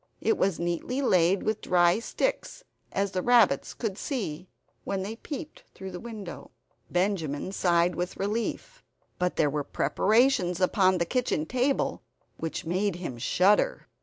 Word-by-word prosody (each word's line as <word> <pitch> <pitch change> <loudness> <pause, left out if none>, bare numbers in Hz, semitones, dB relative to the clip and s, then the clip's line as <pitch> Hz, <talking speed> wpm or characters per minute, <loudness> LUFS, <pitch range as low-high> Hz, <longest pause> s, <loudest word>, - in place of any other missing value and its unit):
It 445 - +2
was 195 - 0
neatly 175 +10 -2
laid 185 -7 +3
with 215 0 -1
dry 175 +2 +3
sticks, - - -2 0.3
as 195 0 -1
the 185 - -1
rabbits 230 - +3
could 215 -4 -3
see, 185 - -4 0.4
when 190 -1 -2
they 220 +3 -5
peeped 300 +4 -7
through 190 0 -7
the 180 - -6
window. 210 -7 -8 0.4
Benjamin 180 -4 -1
sighed 175 -2 +2
with 180 +1 -4
relief. 230 - -3 0.4
But 180 0 0
there 150 - +3
were 145 0 -1
preparations 190 - +2
upon 185 0 +3
the 170 - 0
kitchen 245 -9 0
table 255 - 0 0.4
which 165 0 -4
made 185 +3 0
him 170 -9 -6
shudder. 190 - +2
190 Hz, 145 wpm, -27 LUFS, 175-230 Hz, 0.4 s, laid